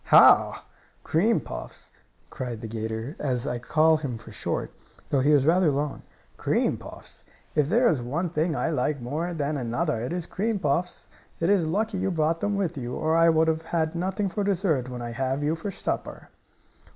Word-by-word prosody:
"Ha! - - +6 0.4
Cream 185 +4 +2
puffs!" 115 - -8 0.4
cried 120 -3 -5
the 115 - -5
'gator, 110 +5 -4
as 125 -4 0
I 120 - -2
call 155 +5 +3
him 135 -6 -4
for - - -12
short, - - -3 0.4
though 140 - +2
he 135 +3 +2
was 145 -3 +5
rather 175 +1 +4
long. 145 +1 -2 0.4
"Cream - - +1
puffs! - - -10 0.3
If 150 -2 +2
there 235 +6 +4
is 150 - +2
one 155 +9 -2
thing 160 0 0
I 165 - 0
like 145 0 0
more 150 +8 -3
than 150 -1 -1
another 125 +1 -1
it 125 - -3
is 175 -1 -2
cream 215 +4 -1
puffs! 175 +2 -1 0.3
It 170 +4 +2
is 185 -6 +3
lucky 205 +4 -1
you 195 - 0
brought 165 -1 +1
them 205 +3 0
with 175 -6 -1
you, 120 0 -4
or 160 +1 +1
I 165 0 +6
would 160 0 +3
have 160 0 0
nothing 190 +4 -1
for 205 +2 -2
dessert 170 -10 +1
when 125 -1 -6
I 120 - -4
have 135 +4 -1
you 155 +2 +1
for 165 +5 -5
supper." - - -4
155 Hz, 190 wpm, -26 LUFS, 130-175 Hz, 0.4 s, Ha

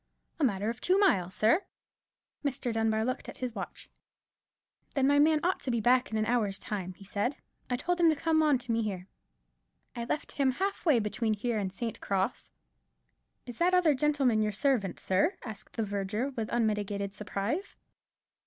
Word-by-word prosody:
"A - - 0
matter 210 -3 +1
of 235 - -10
two 370 +2 +3
mile, 195 - +3
sir." 220 - +3 0.8
Mr. 270 -4 -1
Dunbar 220 0 +1
looked 255 +2 -3
at - - -9
his 250 -2 -3
watch. - - -7 1.1
"Then 270 -2 +3
my 285 +1 +4
man 310 +1 +5
ought 365 +2 +1
to - - -4
be 235 -2 +1
back 250 +3 +3
in 220 - -1
an 215 - +1
hour's 220 -5 +1
time," 185 -4 -5
he 195 - -14
said; 205 +8 -1 0.3
"I 250 - +1
told 350 +8 -1
him 335 -1 +6
to 315 - +3
come 315 +2 +2
on 300 -3 +4
to 245 -1 -6
me 230 0 +2
here. 190 -4 -4 0.9
I 235 -1 -3
left 300 +5 -3
him 270 -2 +1
half 390 +4 -2
way 295 -6 +6
between 215 0 0
here 225 +1 -1
and 190 -2 -2
St. 225 +3 -5
Cross." 195 +4 -1 1.0
"Is 245 -2 -8
that 360 +2 +4
other 345 -4 +5
gentleman 270 -5 +2
your 210 0 +1
servant, 220 -4 0
sir?" 310 - +1
asked 215 -3 -8
the 225 - 0
verger, 205 +5 -2
with 225 -4 -4
unmitigated 205 -3 0
surprise. 210 - -3
235 Hz, 185 wpm, -30 LUFS, 210-280 Hz, 1.1 s, him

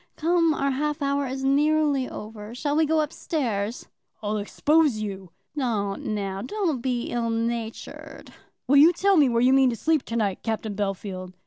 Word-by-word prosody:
Come; 335 0 +2
our 275 0 0
half 295 +2 -2
hour 280 0 0
is 265 +1 -4
nearly 290 -1 +2
over; 215 +1 -8
shall 290 +3 -1
we 315 0 +3
go 315 0 +2
up 300 +1 -3
stairs?" 230 -8 -3 0.4
"I'll 210 +1 -1
expose 295 +5 +2
you." 195 -3 -5 0.3
"Don't 215 -8 -2
now; 195 -1 -3
don't 320 - -2
be 245 -2 -2
ill 235 -1 -1
natured." 230 0 -5 0.3
"Will 280 +3 +5
you 315 +5 +7
tell 395 +3 +2
me 290 -6 +5
where 235 0 +2
you 255 +1 +5
mean 265 -1 +5
to 235 - -2
sleep 315 +4 +1
to 230 - -5
night, 205 -5 0
Captain 220 -1 -3
Bellfield?" 195 -2 -4
255 Hz, 180 wpm, -25 LUFS, 215-300 Hz, 0.4 s, you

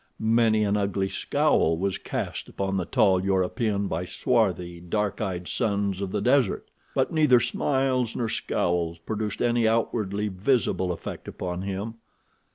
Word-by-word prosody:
Many 110 -1 +3
an 105 0 +1
ugly 100 -1 0
scowl 80 -3 +2
was 95 +2 -1
cast - - -4
upon 95 0 -2
the 90 - -1
tall 95 -5 +3
European 100 +2 0
by 85 +1 -2
swarthy, 90 -6 0
dark 100 +5 -2
eyed 90 -4 -3
sons 100 -2 -1
of 95 -2 -3
the 105 - -1
desert, 125 -2 +2 0.3
but - - +1
neither 150 -6 +5
smiles 130 0 0
nor 120 - -1
scowls 85 -5 -1
produced 105 +5 -3
any 120 -1 +3
outwardly 105 -2 0
visible 95 -2 +1
effect 85 - -6
upon 90 0 -4
him. 100 +3 -4
100 Hz, 145 wpm, -26 LUFS, 95-115 Hz, 0.3 s, neither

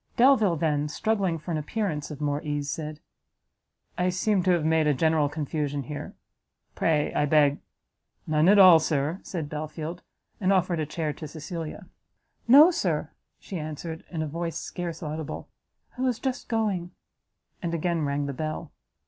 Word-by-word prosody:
Delvile 235 -8 +5
then, 150 -2 0
struggling 190 +2 0
for 165 +3 -7
an 155 - 0
appearance 155 -2 -3
of 150 -3 -7
more 145 0 -1
ease, 145 -1 -2
said, 155 0 -5 1.0
"I 180 0 +2
seem 190 +2 +1
to - - +3
have 170 -4 +3
made 160 -1 +3
a 150 - +3
general 160 0 +2
confusion 145 -1 -2
here: 145 +3 -7 0.6
pray, 150 -2 +1
I 150 - +1
beg" 145 -1 +4 0.7
"None 155 +2 +3
at 205 - +7
all, 185 -4 +9
Sir," 155 +2 -1
said 165 -5 -5
Belfield, 155 +3 -5 0.4
and 190 -1 +2
offered 180 -3 +2
a 155 - -1
chair 155 -1 -2
to 155 - -8
Cecilia. 160 +1 -6 0.6
"No, 290 +8 +9
Sir," - - -1 0.3
she 185 - -6
answered, 155 +2 -6
in 160 -3 -3
a - - -3
voice 165 +2 -3
scarce 170 -2 -5
audible, 155 0 -5 0.5
"I 250 - -6
was 255 -3 +1
just 260 0 -3
going." 205 -6 0 0.7
And 170 -2 -2
again 170 0 0
rang 140 0 -1
the 140 - -3
bell. 155 +3 -4
160 Hz, 165 wpm, -26 LUFS, 150-180 Hz, 1.0 s, all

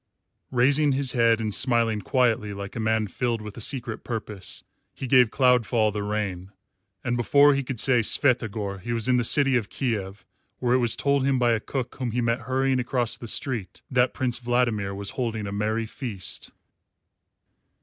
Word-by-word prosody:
Raising 140 +3 +3
his 135 -1 +1
head 115 -2 +3
and 110 -2 -2
smiling 115 -3 +1
quietly 110 -3 0
like 100 0 -7
a - - -4
man 110 0 +1
filled 115 +3 -2
with 105 -1 -9
a 115 - -8
secret 120 -2 -3
purpose, 105 -6 -5 0.3
he - - -6
gave 125 -2 +5
Cloudfall 120 -4 +2
the 105 - -3
rein, 100 -3 -3 0.5
and 120 - -1
before 140 +4 +5
he 140 - 0
could 130 -3 -5
say 125 -1 +3
"Svyatogor" 110 -5 +1
he 120 +5 -4
was 115 0 0
in 125 -1 +3
the 120 - +1
city 135 +2 +4
of 115 -5 -1
Kiev, 105 -6 -3 0.3
where 125 -1 0
it 130 - +4
was 120 -2 +4
told 140 -1 +1
him 135 -1 +2
by 120 -1 +2
a 115 - +1
cook 130 +2 -4
whom 125 -3 -2
he 120 +2 -2
met 115 0 0
hurrying 130 0 +1
across 125 -2 -1
the 120 - -9
street 110 -6 -2
that 125 -1 +2
Prince 125 -2 -1
Vladimir 120 -5 0
was 100 0 -4
holding 115 -4 -3
a 100 - -5
merry 110 +3 -1
feast. 110 -5 -6
120 Hz, 185 wpm, -25 LUFS, 110-130 Hz, 0.5 s, gave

